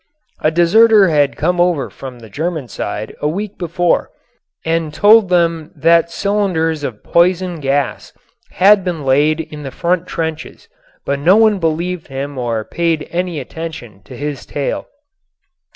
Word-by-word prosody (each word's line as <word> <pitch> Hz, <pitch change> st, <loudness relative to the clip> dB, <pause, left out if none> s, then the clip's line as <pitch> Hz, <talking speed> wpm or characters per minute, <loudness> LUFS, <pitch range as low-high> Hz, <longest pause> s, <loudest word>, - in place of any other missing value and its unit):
A 155 Hz, -, +2 dB
deserter 195 Hz, +5 st, +5 dB
had 145 Hz, -3 st, +1 dB
come 175 Hz, +3 st, +1 dB
over 175 Hz, -6 st, +1 dB
from 130 Hz, -2 st, -9 dB
the 115 Hz, -2 st, -13 dB
German 155 Hz, -, -3 dB
side 105 Hz, -1 st, -5 dB
a 150 Hz, -, 0 dB
week 200 Hz, +6 st, -4 dB
before 175 Hz, 0 st, 0 dB, 0.6 s
and 165 Hz, -1 st, -1 dB
told 205 Hz, +5 st, +5 dB
them 170 Hz, -3 st, +1 dB
that 170 Hz, 0 st, +3 dB
cylinders 170 Hz, -5 st, -1 dB
of 120 Hz, -7 st, -5 dB
poison 175 Hz, 0 st, +1 dB
gas 140 Hz, -1 st, -2 dB, 0.4 s
had 195 Hz, +1 st, +5 dB
been 170 Hz, -6 st, -4 dB
laid 145 Hz, +4 st, +3 dB
in 155 Hz, -1 st, -9 dB
the 140 Hz, -, -6 dB
front 180 Hz, +4 st, -1 dB
trenches, 160 Hz, -2 st, -5 dB, 0.4 s
but 140 Hz, 0 st, -1 dB
no 175 Hz, +7 st, +5 dB
one 220 Hz, -3 st, +4 dB
believed 170 Hz, +1 st, -2 dB
him 135 Hz, 0 st, -5 dB
or 115 Hz, -3 st, -2 dB
paid 165 Hz, +2 st, -1 dB
any 175 Hz, -2 st, -2 dB
attention 145 Hz, -7 st, -8 dB
to -, -, -11 dB
his 145 Hz, -2 st, -4 dB
tale. 145 Hz, -1 st, -3 dB
165 Hz, 150 wpm, -17 LUFS, 145-180 Hz, 0.6 s, deserter